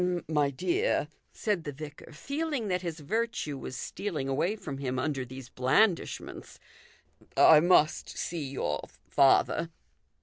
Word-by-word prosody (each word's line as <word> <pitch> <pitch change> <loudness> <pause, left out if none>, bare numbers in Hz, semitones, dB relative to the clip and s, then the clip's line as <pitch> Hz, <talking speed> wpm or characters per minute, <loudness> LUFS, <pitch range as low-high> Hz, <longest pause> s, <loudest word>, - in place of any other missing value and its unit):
" - - -15
My 150 -3 +2
dear," 355 - 0 0.2
said 205 -7 -1
the 145 - -4
vicar, 150 +2 -10
feeling 280 - -3
that 180 -1 0
his 170 -3 -5
virtue 220 -3 -2
was 130 -1 -6
stealing 155 -4 -4
away 160 +10 0
from 140 -10 -7
him 130 -2 -2
under 135 0 -1
these 130 0 -10
blandishments, 165 +10 0 0.4
" - - -30 0.2
I 155 - +9
must 165 -2 +3
see 165 -3 -4
your 75 - -2 0.3
father." 140 +4 +4
155 Hz, 140 wpm, -29 LUFS, 135-200 Hz, 0.4 s, I